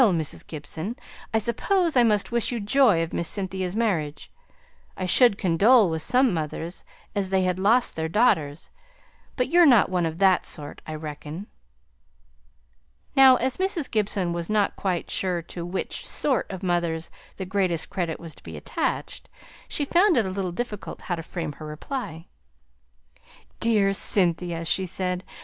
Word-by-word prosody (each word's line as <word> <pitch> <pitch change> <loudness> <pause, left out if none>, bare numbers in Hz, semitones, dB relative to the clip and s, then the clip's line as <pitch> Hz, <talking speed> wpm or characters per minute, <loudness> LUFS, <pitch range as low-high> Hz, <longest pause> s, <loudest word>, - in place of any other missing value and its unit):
Mrs. 170 - +1
Gibson, 160 +7 -5 0.4
I 220 - +2
suppose 320 - +1
I 250 - +6
must 210 -3 +2
wish 235 0 0
you 240 - -2
joy 210 -5 +3
of 165 - -6
Miss 170 - -1
Cynthia's 190 -1 -2
marriage; 175 -10 -2 0.7
I 185 - -2
should 205 +3 +5
condole 200 +3 +4
with 160 0 -2
some 250 +3 +3
mothers 165 +2 -4 0.3
as 200 -2 0
had 185 -1 +1
lost 225 +6 +3
their 160 0 -2
daughters; 160 -8 +1 0.6
but 250 - 0
you're 350 +1 +6
not 240 -7 +5
one 175 -2 +1
of 160 0 -5
that 190 -1 +4
sort, 145 -2 -5
I 155 - -5
reckon." 155 +3 -7 1.7
Now, 265 -1 +8
as 255 +1 -1
Mrs. 375 -6 -2
Gibson 200 -5 0
was 170 -1 -4
not 210 -2 +1
quite 185 -3 -2
sure 180 -3 0
to 170 +1 -7
which 175 +2 -4
"sort" 270 -5 0
of 190 -1 -7
mothers 170 -2 -1 0.3
the 190 - -4
greatest 185 -3 -1
credit 170 -4 -3
was 165 -2 -9
to - - -17
be 80 -2 -9
attached, 75 - -3 0.4
she 290 - -1
found 350 +3 +3
it 225 - +3
a - - -2
little 185 -1 -3
difficult 210 +1 -6
how 175 - -3
to 165 - -6
frame 165 -1 -5
her 155 +2 -10
reply. 165 - -6 1.3
"Dear 210 -4 +3
Cynthia!" 175 -3 +1
she 185 +3 +1
said. 180 0 -2
190 Hz, 160 wpm, -25 LUFS, 165-230 Hz, 1.7 s, Now